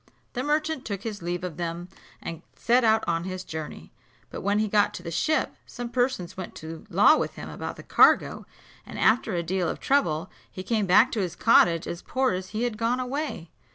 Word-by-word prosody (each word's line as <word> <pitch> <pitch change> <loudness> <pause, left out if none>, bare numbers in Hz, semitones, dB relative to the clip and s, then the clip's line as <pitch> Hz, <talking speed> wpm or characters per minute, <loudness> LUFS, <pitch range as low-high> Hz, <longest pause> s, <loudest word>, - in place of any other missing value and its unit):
The 250 - -2
merchant 300 0 0
took 200 -5 -5
his 215 -4 -5
leave 175 +1 -3
of 175 -4 -5
them 170 0 -4 0.4
and 165 -1 -6
set 245 +1 +2
out 220 -1 +4
on 165 0 0
his 185 0 -5
journey; 155 - -7 0.4
but - - -6
when 200 +2 +1
he 215 0 +1
got 205 0 +2
to - - -8
the 170 - -5
ship, 310 - 0
some 245 -1 -6
persons 245 -8 -1
went 185 -1 -7
to 160 +5 -9
law 200 - +6
with - - -3
him - - -8
about - - -6
the - - -11
cargo, - - +4 0.4
and - - -10
after 220 -4 +2
a 170 - -1
deal 180 0 -1
of - - -4
trouble, 190 - +1 0.2
he 185 - -8
came 215 0 0
back 210 +8 +6
to 225 - -2
his 175 -3 -3
cottage 170 -7 +4
as 170 - -5
poor 260 0 0
as 185 0 -4
he 220 +2 -3
had 235 -3 -2
gone 235 +2 +1
away. 255 - -4
200 Hz, 215 wpm, -26 LUFS, 170-245 Hz, 0.4 s, law